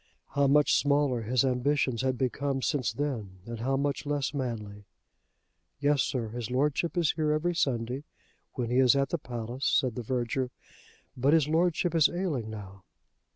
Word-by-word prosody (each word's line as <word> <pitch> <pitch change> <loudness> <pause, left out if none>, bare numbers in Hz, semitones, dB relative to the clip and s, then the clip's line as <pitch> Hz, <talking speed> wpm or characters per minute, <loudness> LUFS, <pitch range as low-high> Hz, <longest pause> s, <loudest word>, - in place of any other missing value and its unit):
How 140 0 +2
much 145 +1 +4
smaller 140 -4 +2
his 125 +4 +1
ambitions 130 -1 +1
had 130 -1 0
become 135 +1 -1
since 145 -5 0
then, 115 -10 -4
and 115 -1 -6
how 135 +3 0
much 140 0 -1
less 145 -1 -1
manly. 105 -7 -4 0.9
"Yes, 145 -1 +3
sir; 120 -4 -2
his 120 0 -5
Lordship 145 +7 0
is 170 -3 +3
here 155 -2 0
every 160 +4 +1
Sunday 125 -3 -1 0.5
when 120 -2 -3
he 125 - +3
is 130 0 +6
at 140 0 +1
the 170 - -1
palace," 120 +1 -4
said 130 -3 +2
the 125 - -4
verger. 125 +2 -1 0.7
"But 135 +4 +2
his 160 -3 +4
Lordship 170 +1 +1
is 160 -3 +5
ailing 165 - -2
now." 100 -3 -9
135 Hz, 165 wpm, -29 LUFS, 120-145 Hz, 0.9 s, is